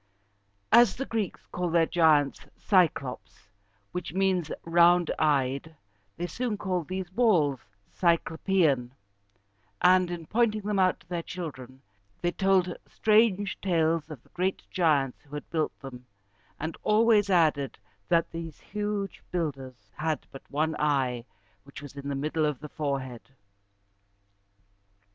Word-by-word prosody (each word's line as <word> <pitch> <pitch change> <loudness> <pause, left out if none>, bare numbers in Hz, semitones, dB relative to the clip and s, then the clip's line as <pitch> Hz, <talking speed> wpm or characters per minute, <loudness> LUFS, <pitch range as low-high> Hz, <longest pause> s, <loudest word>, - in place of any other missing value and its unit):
As 235 -3 +6
the 270 - -4
Greeks 220 -6 -3
called 180 -2 -2
their 165 -1 +5
giants 155 -5 +2
Cy´clops, 165 -10 0 0.4
which 180 -3 -5
means 185 -4 +1
"round 170 0 +4
eyed," 140 +1 0 0.4
they 175 - -2
soon 230 +3 -3
called 185 -5 -2
these 185 -1 -4
walls 180 - +3 0.3
Cy 170 -2 +3
clo 160 0 -9
pe´an; 150 -11 +1 0.9
and, 185 0 +4
in 175 -2 -5
pointing 215 +2 +1
them 205 -1 -1
out 185 -1 +2
to - - -23
their 175 -1 -3
children, 135 -8 -8 0.4
they 175 - 0
told 185 -2 +2
strange 210 -2 +2
tales 165 -3 +1
of 145 -6 -9
the - - -26
great 185 +2 -2
giants 145 -7 +1
who 145 0 -11
had 150 - -6
built 160 -2 -1
them, 125 -2 -10 0.5
and 160 +2 -4
always 215 -1 +4
added 155 -7 +2 0.3
that 170 -1 +2
these 165 -2 -7
huge 205 -1 -4
builders 135 -7 -5
had 155 -2 -2
but 135 - -10
one 155 +3 0
eye, 130 -5 0 0.4
which 140 - -11
was 145 -1 -10
in 140 0 -6
the 140 - -2
middle 155 +2 0
of 145 -4 -3
the 150 - -9
forehead. 135 -6 -4
165 Hz, 140 wpm, -28 LUFS, 145-185 Hz, 0.9 s, As